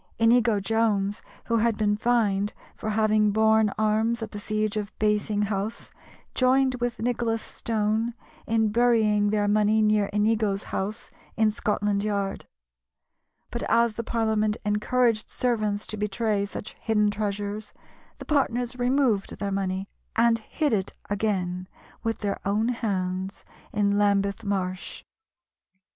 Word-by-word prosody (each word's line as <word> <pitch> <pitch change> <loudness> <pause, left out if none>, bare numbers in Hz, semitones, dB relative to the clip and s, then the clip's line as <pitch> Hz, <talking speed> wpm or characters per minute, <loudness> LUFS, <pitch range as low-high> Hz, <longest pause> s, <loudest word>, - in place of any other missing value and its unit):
Inigo 230 -2 +4
Jones, 205 -1 0 0.2
who 230 - +1
had 225 -1 +2
been 210 -1 +2
fined 210 -3 +1 0.2
for 220 - -4
having 215 0 +3
borne 220 0 +4
arms 220 +2 +1
at 215 - -6
the 205 - -6
siege 215 0 -1
of 210 -1 -3
Basing 210 0 +1
House, 205 +1 -3 0.4
joined 260 +1 +3
with 245 -1 -1
Nicholas 235 -2 0
Stone 220 +1 -1 0.3
in 220 -1 +2
burying 215 -2 +3
their 205 0 +1
money 210 +1 +3
near 210 -1 +3
Inigo's 210 -1 +1
house 210 +3 -4 0.3
in 220 -1 +4
Scotland 205 -1 0
Yard; 200 -2 -2 1.1
but 235 - -3
as 235 -1 +3
the 230 - -4
Parliament 220 -2 0
encouraged 215 +2 +1
servants 215 -4 -1
to 215 - -4
betray 210 0 0
such 205 - -7
hidden 210 -2 +2
treasures, 205 0 -3 0.5
the - - -9
partners 250 -4 0
removed 245 -5 +1
their 200 -1 -3
money 195 0 -2 0.3
and 230 0 +4
hid 295 +5 -1
it 195 -3 -1 0.2
again 185 -3 -1 0.3
with 225 -1 -2
their 200 -1 -2
own 210 +4 +1
hands 190 -4 -2 0.3
in 205 -1 +1
Lambeth 200 +1 +1
Marsh. 185 -2 -3
215 Hz, 130 wpm, -26 LUFS, 205-225 Hz, 1.1 s, Inigo